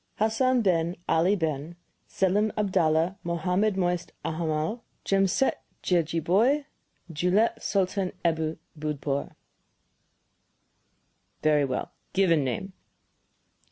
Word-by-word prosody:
"Hassan 235 +3 +2
Ben 170 -2 +1
Ali 170 +5 +3
Ben 160 -2 -3 0.3
Selim 205 +3 +1
Abdallah 180 -3 +1
Mohammed 180 +5 0
Moisé 180 -2 0 0.2
Alhammal 160 +6 -1 0.2
Jamsetjejeebhoy 195 - +1 0.5
Dhuleep 180 +8 +2
Sultan 190 -1 0
Ebu 160 -1 0 0.2
Bhudpoor." 145 -2 -3 2.1
"Very 150 -2 +4
well. 130 -1 -3 0.2
Given 170 -6 +3
name?" 185 +10 -3
180 Hz, 80 wpm, -27 LUFS, 160-195 Hz, 2.1 s, Very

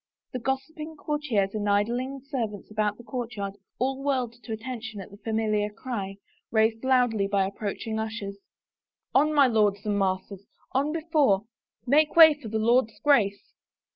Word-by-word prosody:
The 255 - -2
gossiping 285 +5 -4
courtiers 270 -11 -1
and 210 -1 -1
idling 240 +7 0
servants 235 -8 -4
about 210 -1 0
the 240 - -12
courtyard 225 -4 -4 0.2
all 265 +2 -1
whirled 260 -4 0
to 235 - -9
attention 220 -1 -5
at 195 - -9
the 200 - -12
familiar 215 -1 0
cry, 210 -3 -5 0.3
raised 220 +1 +2
loudly 245 -6 +3
by 200 -1 +2
approach 200 +1 -4
ing 220 -1 -2
ushers, 215 -3 -5 0.4
" - - -67 0.3
On, 295 +3 +4
my 290 -2 +6
lords 210 -4 +2
and 205 -1 0
masters, 190 0 -2 0.3
on 280 +3 +1
before; 305 - +2 0.4
make 300 +4 +3
way 320 -2 +10
for 290 -7 -9
my 220 - -1
Lord's 225 0 +2
Grace." 215 -9 +2
225 Hz, 160 wpm, -27 LUFS, 205-265 Hz, 0.4 s, way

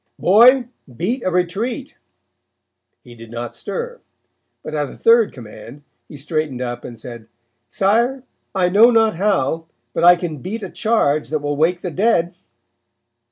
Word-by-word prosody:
'Boy, 240 +6 +5 0.3
beat 235 +9 -2
a - - 0
retreat.' 215 - -2 1.1
He 120 - -14
did 115 -1 -13
not 120 0 -6
stir, 485 0 -5 0.6
but 155 - -7
at 145 -2 -2
a - - -12
third 230 -1 +4
command, 120 +3 -12 0.2
he 150 - -11
straightened 150 -2 -3
up 120 -1 -5
and 120 - -9
said: 115 -1 -10 0.4
'Sire, 235 - +1 0.3
I 185 -2 +2
know 215 +6 +6
not 225 -5 +2
how, 165 -5 0 0.3
but - - -2
I 175 +1 +8
can 170 -3 -5
beat 210 - -6
a 190 - -6
charge 155 -10 0
that 155 - 0
will 145 0 -3
wake 170 +4 +1
the 180 - -4
dead.' 175 -2 +1
175 Hz, 155 wpm, -19 LUFS, 145-225 Hz, 1.1 s, I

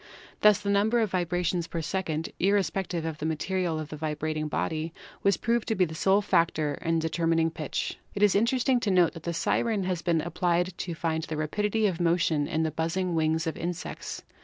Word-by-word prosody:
Thus 210 -1 +6
the 200 -1 -1
number 215 +4 +3
of 220 -4 +1
vibrations 175 -1 0
per 170 - -4
second, 160 -2 -2
irrespective 190 -3 +1
of 160 -1 -4
the 150 - -3
material 170 +1 -1
of 155 -1 -6
the 155 - -6
vibrating 155 0 -2
body, 160 +1 -2 0.3
was 200 - +3
proved 235 -1 0
to 225 - +1
be 185 - +3
the 160 - -7
sole 195 +5 +3
factor 160 -6 +1
in 165 0 +1
determining 165 0 +1
pitch. 155 -2 -4 0.2
It 200 - +1
is 205 - +6
interesting 245 +4 +2
to 220 - -1
note 180 -3 +4
that 165 - -9
the - - -1
siren 215 +4 +1
has 180 -2 -1
been 170 -2 +1
ap 170 - -6
plied 175 +1 +1
to 170 -2 -4
find 160 -1 -1
the 155 - -4
rapidity 210 +8 0
of 185 -4 0
motion 165 -3 +2
in 160 +1 0
the 160 - 0
buzzing 175 +3 -1
wings 160 0 +1
of 160 - -2
insects. 175 +1 -5
170 Hz, 205 wpm, -28 LUFS, 160-195 Hz, 0.3 s, Thus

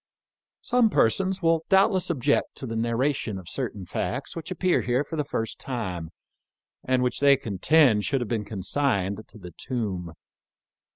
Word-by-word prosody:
" - - -68 0.2
Some 245 -2 +3
persons 190 - +1
will 165 -1 +3
doubtless 190 -1 +3
object 145 -3 +1
to - - -6
the 115 -2 -4
narra 120 +5 +1
tion 110 -6 -4
of 90 -3 -10
certain 105 -5 -4
facts - - -3
which 165 -1 -6
appear 185 0 +1
here 125 +3 +1
for 160 - -7
the 150 - 0
first 115 -5 -4
time, 95 -11 -4 0.7
and 130 -1 +1
which 125 - 0
they 140 -1 +6
contend 110 - +3
should 135 +4 0
have 120 - -2
been 110 -2 -1
consigned 100 -1 -1
to - - -13
the 90 -4 -10
tomb. 95 - -4
125 Hz, 170 wpm, -26 LUFS, 105-150 Hz, 0.7 s, they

